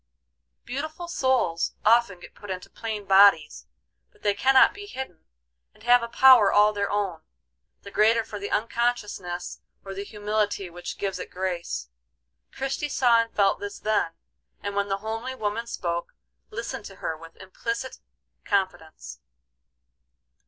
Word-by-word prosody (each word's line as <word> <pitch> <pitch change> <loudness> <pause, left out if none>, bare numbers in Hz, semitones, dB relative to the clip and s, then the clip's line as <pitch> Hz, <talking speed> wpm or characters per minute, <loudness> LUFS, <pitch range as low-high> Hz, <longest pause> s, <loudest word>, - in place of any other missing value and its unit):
Beautiful 310 +6 -5
souls 260 - 0
often 225 -4 +4
get - - -12
put 205 - -12
into 185 -1 -6
plain 215 -3 -5
bodies, 195 -5 +5 0.4
but 425 - -28
they 205 - +3
cannot 260 +6 +5
be 410 0 -9
hidden, 260 - -8 0.5
and 215 - -20
have 245 +1 +6
a 235 - -3
power 240 -3 +7
all 210 +1 +5
their 200 -1 -1
own, 195 -6 -2 0.6
the 200 - -10
greater 225 +2 +4
for 210 -2 -8
the 200 - -5
unconsciousness 210 -6 -2 0.2
or 195 - -6
the 195 +1 -5
humility 205 -2 -2
which 175 +1 -7
gives 195 -2 -3
it - - -6
grace. 175 - -4 0.6
Christie 270 +2 -3
saw 240 -4 +4
and 230 - -5
felt 200 -1 +3
this 205 0 -6
then, 210 -6 0 0.5
and 200 0 -3
when 200 0 0
the 195 - 0
homely 225 +4 -4
woman 220 0 -3
spoke, 170 -5 -4 0.3
listened 220 -1 -5
to 195 - -10
her 160 - -3
with 165 +1 -13
implicit 230 +7 -5 0.4
confidence. 160 - -2
205 Hz, 145 wpm, -26 LUFS, 190-235 Hz, 0.6 s, power